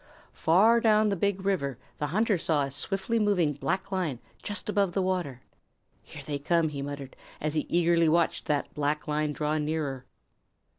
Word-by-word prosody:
Far 210 +8 +4
down 215 -2 +4
the 200 - +1
Big 195 +1 -1
River 140 - 0 0.2
the 150 - -1
hunter 205 +3 +1
saw 155 -3 +1
a 135 - -4
swiftly 195 - -1
moving 190 -8 +2
black 190 +8 -2
line 180 -9 -1 0.2
just 205 - -4
above 200 -4 +1
the 195 - +1
water. 175 -9 -2 0.6
"Here - - -11
they 145 -1 -3
come," 165 +2 +2
he 140 -2 -5
muttered, 140 -1 -6 0.2
as 155 0 -2
he 155 - -1
eagerly 170 -1 +3
watched 170 +1 +1
that 145 -2 -1
black 150 +1 -1
line 150 0 0
draw 150 +1 -1
nearer. 150 -4 -3
160 Hz, 170 wpm, -28 LUFS, 145-195 Hz, 0.6 s, Far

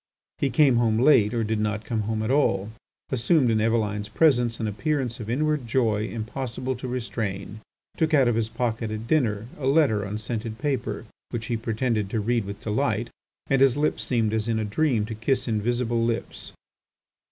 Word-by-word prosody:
He 140 - +1
came 140 -4 +4
home 115 -2 +2
late 120 -4 +5
or 115 -2 0
did 110 0 -1
not 105 0 -2
come 110 -1 -1
home 110 -1 -1
at 110 - -1
all, 110 -8 +2 0.4
assumed 130 +1 +3
in 110 -1 +2
Eveline's 105 -2 0
presence 120 -4 +3
an 110 - -1
appearance 125 +3 -1
of 110 -1 -6
inward 150 0 0
joy 110 -3 +1
impossible 120 +3 -4
to 130 - -6
restrain, 110 -5 -4 0.4
took 160 0 +1
out 140 -5 +5
of 120 - +3
his 110 -1 0
pocket, 115 -2 -2
at 110 +1 -5
dinner, 115 -7 +1
a 130 - -2
letter 135 -8 +3
on 100 +1 -4
scented 110 0 -4
paper 125 -5 -2 0.2
which 115 -2 -4
he - - +2
pretended 110 -2 -1
to 110 - -1
read 115 0 0
with 100 +1 -8
delight, 115 0 -1 0.3
and 135 -1 +1
his 135 -1 +5
lips 150 +1 0
seemed 115 -4 0
as 110 0 0
in 115 -1 +1
a 110 - -1
dream 115 0 +1
to 110 - -5
kiss 125 +4 -1
invisible 115 +1 0
lips. 115 0 -3
115 Hz, 185 wpm, -25 LUFS, 110-130 Hz, 0.4 s, late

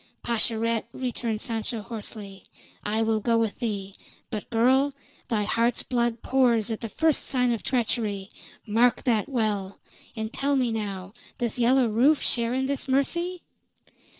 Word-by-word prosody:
"Pascherette!" 230 -1 0
returned 235 -4 -3
Sancho 225 -1 -3
hoarsely. 210 -3 -7 0.4
"I 220 +2 +1
will 220 -1 +1
go 230 +2 +2
with 225 -2 0
thee. 200 -5 -3 0.4
But, 215 -3 -5
girl, 260 +4 +3 0.3
thy 220 -4 +1
heart's 230 +3 +1
blood 240 -2 0
pours 240 -4 +3
at 220 - -3
first 320 +5 +2
sign 250 -2 +2
of 230 - -3
treachery! 215 -5 -1 0.3
Mark 235 +2 +3
that 230 -3 +1
well. 210 -6 -1 0.4
And 220 0 -4
tell 280 +1 +1
me 250 -3 +2
now, 200 -3 -4 0.2
does 240 0 -1
Yellow 250 +1 +4
Rufe 255 +8 +4
share 235 0 +1
in 265 0 0
this 280 0 -2
mercy?" 340 +7 0
230 Hz, 145 wpm, -26 LUFS, 215-255 Hz, 0.4 s, Yellow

